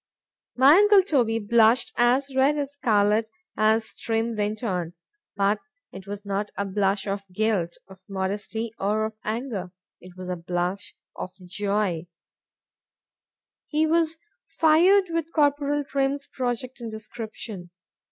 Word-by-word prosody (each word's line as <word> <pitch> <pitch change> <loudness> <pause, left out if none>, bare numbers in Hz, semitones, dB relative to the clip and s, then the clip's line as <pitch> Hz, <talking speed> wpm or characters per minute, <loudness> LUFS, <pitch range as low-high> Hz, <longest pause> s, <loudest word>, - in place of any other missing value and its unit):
My 275 +6 +7
uncle 410 -1 +6
Toby 245 - +1
blushed 225 +2 +3
as 260 +3 +2
red 275 +3 +3
as 285 -1 -3
scarlet 215 -4 +2 0.3
as 220 +1 +1
Trim 225 +1 -1
went 210 +2 -2
on;—but 195 - -2 0.3
it 190 - -10
was 205 0 -6
not 200 +1 -2
a 200 - -1
blush 195 0 0
of 200 0 -2
guilt,—of 190 -2 -2
modesty,—or 210 +2 -2
of 220 0 -7
anger,—it 190 -6 -6
was 185 0 -7
a 180 - -1
blush 175 +2 -3 0.2
of 185 - -6
joy;—he 185 -3 -2 1.7
was 325 0 +1 0.3
fired 350 +4 +4
with 330 -1 -2
Corporal 290 -1 +2
Trim's 275 0 -1
project 250 0 -4
and 230 - -5
description. 220 -3 -8
220 Hz, 115 wpm, -25 LUFS, 195-270 Hz, 1.7 s, My